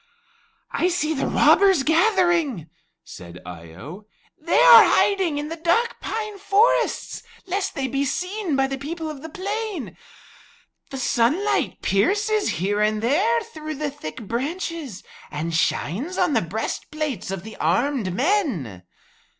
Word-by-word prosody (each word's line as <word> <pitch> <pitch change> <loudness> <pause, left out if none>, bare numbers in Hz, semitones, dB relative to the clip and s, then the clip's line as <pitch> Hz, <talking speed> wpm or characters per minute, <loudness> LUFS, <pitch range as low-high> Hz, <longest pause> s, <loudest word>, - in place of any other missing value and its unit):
'" - - -35 0.3
"I 355 - +1
see 340 -3 0
the 275 - -2
robbers 385 -8 +4
gathering," 335 - +2 0.4
said 85 0 -11
Eye 85 -2 -10
o. 175 - -10 0.3
"They 330 +2 +1
are - - +10
hiding 380 -7 +2
in 295 +1 -4
the 330 - -4
dark 345 +9 +1
pine 430 -2 -5
forests, 410 +4 +1 0.2
lest 390 +1 -2
they 270 -1 -2
be 275 +2 -1
seen 360 +4 -2
by 270 0 +2
the 270 0 -4
people 320 +3 -5
of 285 -3 -10
the 320 - -8
plain. 400 - -4 0.9
The 270 - -6
sunlight 265 - 0
pierces 410 - +1
here 200 +6 -1
and 215 0 +1
there 405 - +2
through 310 -9 -7
the 295 0 -3
thick 155 - -8
branches 280 - -4 0.3
and 160 +3 -4
shines 215 - -1
on 355 -5 +2
the 225 - +3
breastplates 230 - -4
of 195 -2 -4
the 220 - -10
armed 245 -6 0
men." 235 - -1
300 Hz, 140 wpm, -23 LUFS, -, 0.9 s, are